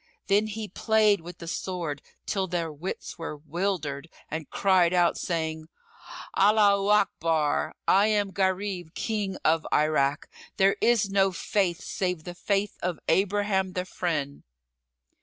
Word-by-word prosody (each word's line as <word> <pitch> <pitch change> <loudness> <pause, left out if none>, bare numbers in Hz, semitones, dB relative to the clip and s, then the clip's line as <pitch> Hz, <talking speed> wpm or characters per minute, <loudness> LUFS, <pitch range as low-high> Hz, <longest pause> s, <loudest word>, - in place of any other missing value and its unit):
Then 205 +2 +2
he 215 0 -5
played[FN#38] 215 0 +2
with 175 +1 -10
the 170 - -9
sword 165 -5 -3 0.2
till 190 -2 -1
their 170 -3 -2
wits 170 +3 -6
were 160 -2 -5
wildered, 160 -2 -3 0.2
and 160 0 -4
cried 185 -3 +3
out, 175 -1 +3
saying, 160 -2 -3 0.7
"Allaho 200 -1 +4
Akbar! 165 -7 +1
I 200 +2 +5
am 205 -2 +1
Gharib, 190 -3 -1
King 210 -4 -2
of 160 +1 +3
Irak. 150 -2 +2 0.3
There 195 +1 +4
is 225 -4 +3
no 195 -1 +3
Faith 180 -1 -1
save 180 -4 -2
the 175 - -7
Faith 200 +3 -1
of 175 -2 -2
Abraham 195 0 +1
the 180 0 -2
Friend!" 155 -6 -3
185 Hz, 135 wpm, -27 LUFS, 165-200 Hz, 0.7 s, I